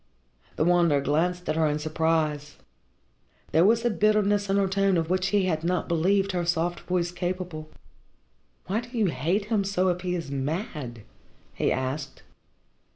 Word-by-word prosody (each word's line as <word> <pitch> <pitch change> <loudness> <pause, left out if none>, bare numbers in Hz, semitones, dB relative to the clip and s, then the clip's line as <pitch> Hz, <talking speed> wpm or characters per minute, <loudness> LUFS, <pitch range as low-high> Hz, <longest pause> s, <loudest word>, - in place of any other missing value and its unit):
The 155 - +1
Wanderer 170 -4 +4
glanced 175 +5 0
at 155 - 0
her 160 -1 +2
in 150 0 0
surprise. 155 -1 -1 0.9
There 165 - +4
was 230 +4 +3
a 240 - +3
bitterness 205 -1 +2
in 195 - +2
her 200 -1 +2
tone 195 -1 +2
of 165 +1 -1
which 185 0 +1
he 205 -1 +2
had 160 -3 -1
not 180 +1 0
believed 190 +4 +2
her 175 -1 -1
soft 170 0 0
voice 175 -1 -1
capable. 175 -3 -4 1.0
"Why 210 +5 -1
do 240 0 -9
you 205 -6 +2
hate 170 +11 0
him 210 -2 +1
so 190 -1 +1
if 180 0 -1
he 180 0 -2
is 165 -5 -5
mad?" 140 - -4 0.5
he - - 0
asked. 135 +2 -3
175 Hz, 165 wpm, -26 LUFS, 155-195 Hz, 1.0 s, Wanderer